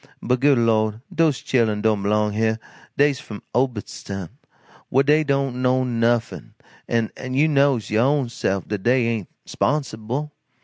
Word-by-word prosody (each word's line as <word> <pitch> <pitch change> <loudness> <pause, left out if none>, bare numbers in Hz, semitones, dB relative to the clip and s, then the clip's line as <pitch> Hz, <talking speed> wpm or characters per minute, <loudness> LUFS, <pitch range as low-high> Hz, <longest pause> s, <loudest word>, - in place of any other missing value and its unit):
But 125 +1 0
good 140 0 +4
Lord, 110 -1 +1
dose 155 -6 +2
chilen 110 -5 +1
don't 110 -2 +2
b'long 105 +1 +1
heah, 110 +1 +1 0.4
dey's 145 -2 +3
f'm 105 -2 -9
Obedstown 105 -7 -3 0.6
whah 135 +2 +3
dey 150 +2 +4
don't 140 -3 -1
know 130 0 +2
nuffin, 115 -1 -1 0.3
an' 115 -2 0 0.2
you 150 +4 +4
knows, 140 -8 +2
yo' 110 +2 +3
own 140 -1 +2
sef, 100 -4 -2
dat 105 -2 -3
dey 125 +3 +2
ain't 115 -5 -2 0.2
'sponsible. 140 0 -2
120 Hz, 145 wpm, -22 LUFS, 110-135 Hz, 0.6 s, good